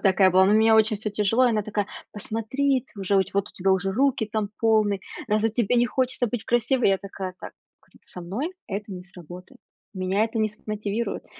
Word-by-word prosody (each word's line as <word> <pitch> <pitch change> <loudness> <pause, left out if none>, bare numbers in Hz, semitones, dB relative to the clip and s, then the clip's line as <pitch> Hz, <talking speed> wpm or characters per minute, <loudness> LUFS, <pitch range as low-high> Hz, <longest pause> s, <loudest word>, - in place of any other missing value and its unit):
Вот - - -24
такая 190 -1 +4
была, 185 +1 +5
но 200 - +3
у - - +5
меня 220 0 +5
очень 220 -1 +4
всё 215 +1 -4
тяжело, 210 +5 +2
и - - +3
она 215 -2 0
такая: 205 -1 -2 0.3
"Посмотри, 260 +5 -1
т 265 - -25 0.4
вот 200 +1 0
у - - -16
тебя 190 +1 0
уже 190 0 +1
руки, 255 -2 +1
там, 215 -2 -1
полные, 215 -3 +2 0.3
разве 215 +1 +2
тебе 235 +1 +1
не 240 0 +4
хочется 255 -1 0
быть 225 0 -4
красивой?" 240 +1 +2
Я 195 -1 +2
такая: 190 -2 -7
"Так,- - - -8 0.3
говорю,- - - -25
со 180 - -9
мной 230 - -4
это 205 0 -5
не 180 -1 -7
сработает, 180 -1 -12 0.4
меня 185 +3 +1
это 225 0 -4
не 215 - +2
смотивирует, 215 +1 -4
215 Hz, 210 wpm, -25 LUFS, 195-230 Hz, 0.4 s, была